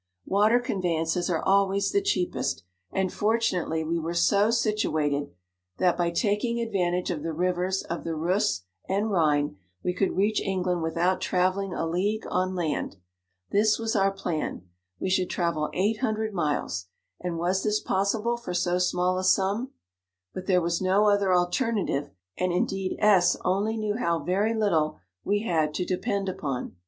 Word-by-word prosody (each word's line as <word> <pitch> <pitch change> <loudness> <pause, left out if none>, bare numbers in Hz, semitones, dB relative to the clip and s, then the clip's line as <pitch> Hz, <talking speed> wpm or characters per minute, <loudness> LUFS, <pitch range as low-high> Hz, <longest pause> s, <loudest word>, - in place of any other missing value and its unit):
Water 210 +5 +4
conveyances 175 -7 -1
are 165 -3 0
always 195 0 +2
the 400 - +2
cheapest, 135 - -1 0.3
and 190 -1 -1
fortunately 195 -7 0
we 165 +2 -1
were 165 +1 -3
so 200 +5 +3
situated, 155 -11 0 0.5
that 180 -2 +3
by 175 -1 +1
taking 210 +6 0
advantage 180 -6 0
of 160 -4 -3
the 165 +2 -3
rivers 180 +3 0
of 170 - -5
the 165 -1 -3
Reuss 165 - 0 0.3
and 205 +3 0
Rhine, 150 - +2 0.3
we 180 - 0
could 190 +1 -1
reach 210 +2 +2
England 185 -3 -1
without 170 +3 0
travel 185 +2 +1
ling 195 -2 -4
a - - -1
league 195 +6 -1
on 185 +1 0
land. 160 - -2 0.6
This 210 +1 +3
was 225 0 -2
our 195 -1 +4
plan; 175 - -3 0.4
we - - -2
should 185 -1 +1
travel 170 -4 -1
eight 210 +4 0
hundred 220 -3 -1
miles, 145 - -1 0.3
and 175 -2 -3
was 180 +3 0
this 210 0 +1
possible 210 +5 0
for 180 -7 -5
so 175 0 +1
small 180 0 +1
55 - - 0
a - - -3
sum? 200 +6 +2 0.6
but 185 0 -7
there 180 -2 +4
was 170 +1 0
no 195 +3 +3
other 200 -2 +2
alter 180 +7 +2
native, 190 -10 -1 0.3
and 185 0 +1
indeed 190 +2 -1
S 200 -4 +4
only 205 +5 +1
knew 215 -1 -1
how 170 -8 +1
very 195 +8 0
little 170 -8 +1 0.3
we 205 +1 +1
had 155 -7 0
to 180 - -1
depend 200 +2 -1
upon. 140 - -4
185 Hz, 165 wpm, -26 LUFS, 170-205 Hz, 0.6 s, Water